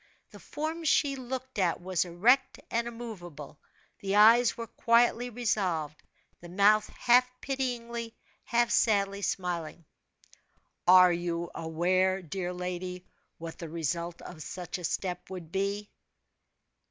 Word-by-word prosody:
The -, -, -12 dB
form 320 Hz, +2 st, -4 dB
she 285 Hz, -2 st, +2 dB
looked 260 Hz, -2 st, -6 dB
at 175 Hz, -3 st, +1 dB
was 185 Hz, 0 st, -1 dB
erect 210 Hz, +10 st, +2 dB
and 235 Hz, +1 st, 0 dB
immovable, 175 Hz, -12 st, -9 dB, 0.4 s
the 195 Hz, 0 st, -2 dB
eyes 230 Hz, +3 st, +6 dB
were 230 Hz, -, -4 dB
quietly 235 Hz, +1 st, +2 dB
resolved, 185 Hz, -10 st, -1 dB, 0.4 s
the 175 Hz, -, -11 dB
mouth 205 Hz, +3 st, +4 dB
half 250 Hz, +1 st, +3 dB
pityingly, 235 Hz, -4 st, -3 dB, 0.3 s
half 235 Hz, 0 st, +1 dB
sadly 200 Hz, -2 st, +2 dB
smiling. 175 Hz, -4 st, -3 dB, 1.0 s
"Are 180 Hz, 0 st, +8 dB
you 170 Hz, 0 st, -3 dB
aware, 185 Hz, +4 st, 0 dB
dear 180 Hz, +2 st, -4 dB
lady, 180 Hz, 0 st, -5 dB, 0.3 s
what 165 Hz, 0 st, -8 dB
the 165 Hz, -, -6 dB
result 170 Hz, +2 st, -3 dB
of 165 Hz, -3 st, -10 dB
such 175 Hz, +4 st, -6 dB
a -, -, -10 dB
step 180 Hz, +1 st, -3 dB
would 180 Hz, -4 st, -8 dB
be?" 200 Hz, +2 st, -2 dB
190 Hz, 125 wpm, -29 LUFS, 175-235 Hz, 1.0 s, Are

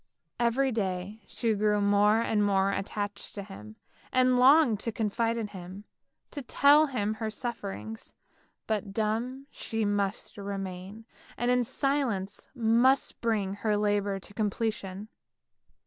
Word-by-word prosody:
Every 250 Hz, +3 st, +2 dB
day 195 Hz, -1 st, -3 dB
she 230 Hz, -2 st, -1 dB
grew 210 Hz, 0 st, +2 dB
more 205 Hz, +2 st, +4 dB
and 215 Hz, -2 st, +1 dB
more 195 Hz, -1 st, +2 dB
attached 205 Hz, +1 st, -4 dB
to 200 Hz, -, -5 dB
him, 110 Hz, -, -11 dB, 0.4 s
and 255 Hz, 0 st, +4 dB
longed 255 Hz, -4 st, +6 dB
to 230 Hz, -, -2 dB
confide 230 Hz, +1 st, -1 dB
in 220 Hz, -3 st, -3 dB
him, 185 Hz, +1 st, -9 dB, 0.5 s
tell 285 Hz, +2 st, +4 dB
him 215 Hz, -6 st, -1 dB
her 220 Hz, 0 st, -3 dB
sufferings; 110 Hz, -, -6 dB, 0.5 s
but 210 Hz, -2 st, -2 dB
dumb 230 Hz, +5 st, -2 dB
she 225 Hz, -1 st, -3 dB
must 205 Hz, 0 st, -2 dB
remain, 195 Hz, +1 st, -6 dB, 0.3 s
and 240 Hz, +1 st, +1 dB
in 250 Hz, 0 st, +3 dB
silence 255 Hz, -6 st, -2 dB
must 240 Hz, +3 st, +2 dB
bring 210 Hz, -4 st, 0 dB
her 210 Hz, 0 st, 0 dB
labour 205 Hz, -1 st, +1 dB
to 205 Hz, -, -14 dB
completion. 210 Hz, -2 st, -2 dB
210 Hz, 130 wpm, -29 LUFS, 200-235 Hz, 0.5 s, longed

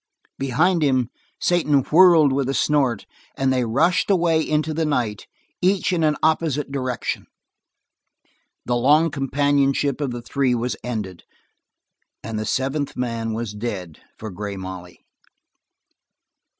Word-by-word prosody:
Behind 160 Hz, +7 st, +1 dB
him, 130 Hz, -5 st, +1 dB, 0.3 s
Satan 150 Hz, -5 st, +2 dB
whirled 160 Hz, -2 st, +5 dB
with 135 Hz, -1 st, 0 dB
a 135 Hz, -, -1 dB
snort, 135 Hz, -7 st, +1 dB, 0.3 s
and 135 Hz, -1 st, +1 dB
they 125 Hz, -1 st, +1 dB
rushed 160 Hz, -, +1 dB
away 170 Hz, -4 st, +3 dB
into 155 Hz, 0 st, -1 dB
the 160 Hz, +1 st, -1 dB
night 120 Hz, -9 st, -2 dB, 0.3 s
each 185 Hz, 0 st, +2 dB
in 165 Hz, -2 st, +1 dB
an 150 Hz, -1 st, +3 dB
opposite 155 Hz, -3 st, +1 dB
direction. 130 Hz, -3 st, -3 dB, 1.4 s
The 120 Hz, -, 0 dB
long 150 Hz, +6 st, +3 dB
companionship 140 Hz, 0 st, +1 dB
of 140 Hz, -, -1 dB
the 120 Hz, -1 st, -6 dB
three 130 Hz, -1 st, 0 dB
was 120 Hz, +1 st, -2 dB
ended, 105 Hz, -7 st, -5 dB, 1.0 s
and 110 Hz, -1 st, -4 dB
the 110 Hz, -, -4 dB
seventh 135 Hz, +4 st, -2 dB
man 115 Hz, -2 st, -2 dB
was 115 Hz, -1 st, -4 dB
dead 100 Hz, -7 st, -5 dB, 0.2 s
for 110 Hz, -1 st, -7 dB
Grey 100 Hz, +1 st, -6 dB
Molly. 95 Hz, -2 st, -9 dB
135 Hz, 130 wpm, -22 LUFS, 115-150 Hz, 1.4 s, whirled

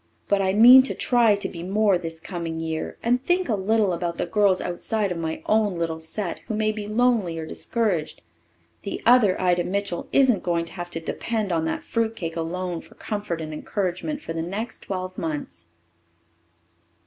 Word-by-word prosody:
But 200 Hz, -1 st, +2 dB
I 190 Hz, -1 st, +2 dB
mean 245 Hz, +5 st, +9 dB
to -, -, -3 dB
try 235 Hz, -4 st, +4 dB
to 200 Hz, -, -4 dB
be 170 Hz, -, -8 dB
more 200 Hz, +2 st, +2 dB
this 165 Hz, -2 st, -4 dB
coming 165 Hz, -1 st, -5 dB
year 160 Hz, -1 st, -4 dB
and 245 Hz, +2 st, +2 dB
think 360 Hz, +4 st, +1 dB
a -, -, +1 dB
little 205 Hz, 0 st, +2 dB
about 170 Hz, 0 st, -3 dB
the -, -, -1 dB
girls 195 Hz, +1 st, +3 dB
outside 205 Hz, +3 st, -2 dB
of 175 Hz, -, -2 dB
my 160 Hz, -1 st, -4 dB
own 210 Hz, -4 st, +2 dB
little 165 Hz, -1 st, -2 dB
set 175 Hz, +3 st, -4 dB
who 220 Hz, -, -2 dB
may 215 Hz, 0 st, +1 dB
be 210 Hz, -1 st, -6 dB
lonely 215 Hz, -6 st, +1 dB
or 160 Hz, -, -4 dB
discouraged. 185 Hz, -, -2 dB, 0.6 s
The 200 Hz, -, -4 dB
other 230 Hz, -6 st, +5 dB
Ida 180 Hz, -1 st, +2 dB
Mitchell 195 Hz, -1 st, -3 dB
isn't 255 Hz, -8 st, +4 dB
going 170 Hz, -1 st, 0 dB
to 165 Hz, -, -12 dB
have 175 Hz, -2 st, -6 dB
to 165 Hz, -, -4 dB
depend 215 Hz, +4 st, -3 dB
on 165 Hz, -1 st, 0 dB
that 160 Hz, -, -2 dB
fruit 225 Hz, -1 st, -1 dB
cake 165 Hz, -5 st, -5 dB
alone 175 Hz, +1 st, -3 dB
for -, -, -18 dB
comfort 205 Hz, -6 st, -4 dB
and 155 Hz, -1 st, -5 dB
encouragement 195 Hz, -, -3 dB
for 165 Hz, -, -5 dB
the 165 Hz, -, -2 dB
next 205 Hz, +7 st, -4 dB
twelve 185 Hz, -1 st, -5 dB
months." 145 Hz, -, -5 dB
185 Hz, 190 wpm, -24 LUFS, 170-215 Hz, 0.6 s, mean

